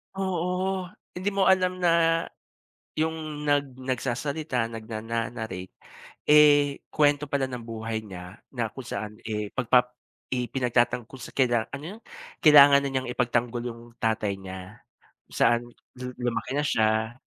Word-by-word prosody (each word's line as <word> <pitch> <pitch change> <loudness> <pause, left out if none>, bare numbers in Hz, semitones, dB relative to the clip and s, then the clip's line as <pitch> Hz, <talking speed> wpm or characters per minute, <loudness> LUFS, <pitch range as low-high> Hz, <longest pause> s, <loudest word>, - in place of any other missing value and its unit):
Oo! 185 0 -1 0.3
hindi 185 +3 -4
mo 195 - +3
alam 185 -1 +3
na 165 -1 +3 0.8
yung 160 +1 +1 0.3
nag 140 -3 0
nagsasalita 130 +1 -2
nagnana-narrate. 110 -3 -5 0.6
Eh 145 -1 +5
kwento 145 -1 +2
pala 135 -2 +1
ng 125 -2 -6
buhay 110 -1 -4
niya 90 0 -10
na 120 -4 -2
kung 135 - -8
saan, 105 +1 -5
eh, 105 -1 -2
pag 125 -4 -2
pap 125 -1 +6 0.4
ipinagtatangol 125 -1 0
sa - - -8
kanila 120 -4 +3
ano 140 +1 -6
yun? - - -22 0.4
Kailangan 145 -2 +9
na 140 - -1
niyang 130 -2 -2
ipagtanggol 120 -1 0
yung 115 0 -12 0.2
tatay 110 -3 0
niya 95 +2 -10 0.5
kung - - -11
saan 120 0 +4 0.4
lu 125 0 -5
lumaki 120 +1 -2
na 145 - +1
siya. 110 -1 +1
125 Hz, 135 wpm, -26 LUFS, 115-145 Hz, 0.8 s, Kailangan